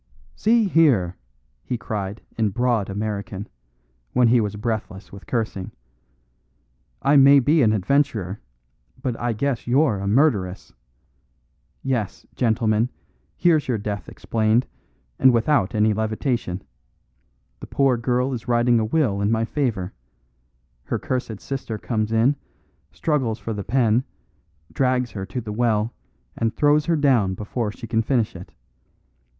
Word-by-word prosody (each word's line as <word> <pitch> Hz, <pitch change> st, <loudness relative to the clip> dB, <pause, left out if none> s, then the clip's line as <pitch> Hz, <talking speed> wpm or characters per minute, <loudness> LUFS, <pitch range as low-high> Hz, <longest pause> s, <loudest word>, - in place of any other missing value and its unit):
"See 225 Hz, 0 st, +3 dB
here!" 130 Hz, -, +3 dB, 0.5 s
he 125 Hz, -, -3 dB
cried 105 Hz, -2 st, -5 dB
in 110 Hz, -2 st, +1 dB
broad 120 Hz, -2 st, 0 dB
American, 105 Hz, 0 st, -4 dB, 0.7 s
when 125 Hz, -2 st, +4 dB
he 120 Hz, 0 st, +4 dB
was 105 Hz, -1 st, -2 dB
breathless 105 Hz, -3 st, -4 dB
with 100 Hz, -, -12 dB
cursing, 110 Hz, -6 st, -3 dB, 1.3 s
"I 140 Hz, -, +4 dB
may 140 Hz, +1 st, +8 dB
be 150 Hz, +5 st, +3 dB
an 110 Hz, -4 st, +4 dB
adventurer, 110 Hz, -3 st, 0 dB, 0.6 s
but 125 Hz, -2 st, -2 dB
I 120 Hz, -1 st, 0 dB
guess 125 Hz, +2 st, -2 dB
you're 130 Hz, -4 st, +3 dB
a 100 Hz, -, -3 dB
murderess. 100 Hz, -, +1 dB, 1.1 s
Yes, 120 Hz, -7 st, -2 dB
gentlemen, 110 Hz, -1 st, +1 dB, 0.5 s
here's 165 Hz, -4 st, +3 dB
your 125 Hz, -3 st, +1 dB
death 100 Hz, -2 st, -5 dB
explained, 110 Hz, +2 st, +1 dB, 0.5 s
and 130 Hz, -, +7 dB
without 115 Hz, -4 st, +2 dB
any 110 Hz, 0 st, +3 dB
levitation. 110 Hz, -3 st, -2 dB, 1.0 s
The -, -, -9 dB
poor 135 Hz, -2 st, +2 dB
girl 125 Hz, +2 st, 0 dB
is 120 Hz, 0 st, -6 dB
writing 120 Hz, 0 st, +3 dB
a 110 Hz, -, 0 dB
will 110 Hz, -6 st, +1 dB
in 100 Hz, -, +1 dB
my 115 Hz, 0 st, +1 dB
favour; 110 Hz, -9 st, -2 dB, 0.9 s
her -, -, -1 dB
cursed 120 Hz, -5 st, -3 dB
sister 130 Hz, -5 st, -5 dB
comes 110 Hz, -1 st, -2 dB
in, 115 Hz, +6 st, +3 dB, 0.6 s
struggles 130 Hz, -8 st, -1 dB
for 115 Hz, -, -5 dB
the 100 Hz, -1 st, -4 dB
pen, 115 Hz, +1 st, +2 dB, 0.7 s
drags 125 Hz, -2 st, +1 dB
her 95 Hz, -2 st, -6 dB
to 125 Hz, -, -4 dB
the 105 Hz, -2 st, -6 dB
well, 110 Hz, -1 st, +1 dB, 0.4 s
and 115 Hz, -1 st, -1 dB
throws 150 Hz, +1 st, +3 dB
her 170 Hz, -, +3 dB
down 125 Hz, -11 st, +2 dB
before 105 Hz, +2 st, -3 dB
she 115 Hz, -, -9 dB
can 115 Hz, 0 st, +1 dB
finish 115 Hz, -2 st, 0 dB
it. 90 Hz, +1 st, -10 dB
115 Hz, 135 wpm, -23 LUFS, 105-130 Hz, 1.3 s, may